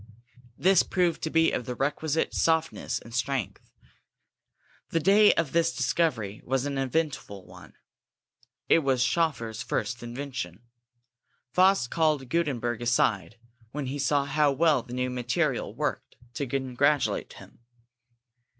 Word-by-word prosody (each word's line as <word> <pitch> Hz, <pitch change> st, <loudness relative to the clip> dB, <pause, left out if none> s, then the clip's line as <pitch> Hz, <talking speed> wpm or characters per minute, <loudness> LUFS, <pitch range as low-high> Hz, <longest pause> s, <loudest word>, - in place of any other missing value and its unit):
This 190 Hz, 0 st, +5 dB
proved 180 Hz, -3 st, 0 dB
to 160 Hz, -, -2 dB
be 165 Hz, +1 st, +3 dB
of 120 Hz, -, -3 dB
the 125 Hz, -, -3 dB
requisite 150 Hz, +4 st, -1 dB
softness 160 Hz, -1 st, 0 dB
and 115 Hz, -, -11 dB
strength. 125 Hz, -3 st, -3 dB, 1.2 s
The 165 Hz, -, +1 dB
day 205 Hz, +5 st, +6 dB
of 165 Hz, -4 st, 0 dB
this 170 Hz, 0 st, +1 dB
discovery 125 Hz, -6 st, -1 dB
was 135 Hz, +1 st, -1 dB
an 140 Hz, -1 st, -2 dB
eventful 135 Hz, -, -2 dB
one. -, -, -14 dB, 0.9 s
It -, -, +5 dB
was 135 Hz, -4 st, +1 dB
Schoeffer's 125 Hz, -8 st, -1 dB
first 110 Hz, +3 st, -3 dB
invention. 120 Hz, -6 st, -6 dB, 0.9 s
Faust 185 Hz, -9 st, +3 dB
called 155 Hz, -5 st, +1 dB
Gutenberg 120 Hz, -8 st, -1 dB
aside 115 Hz, -4 st, +1 dB, 0.4 s
when 145 Hz, -1 st, -3 dB
he 135 Hz, +3 st, -4 dB
saw 140 Hz, +1 st, +1 dB
how 145 Hz, +1 st, +2 dB
well 150 Hz, -1 st, +3 dB
the 120 Hz, +1 st, -9 dB
new 125 Hz, 0 st, -1 dB
material 120 Hz, -1 st, -1 dB
worked, -, -, -3 dB, 0.2 s
to 140 Hz, +4 st, -3 dB
congratulate 135 Hz, +2 st, 0 dB
him. -, -, -15 dB
135 Hz, 130 wpm, -27 LUFS, 120-160 Hz, 1.2 s, day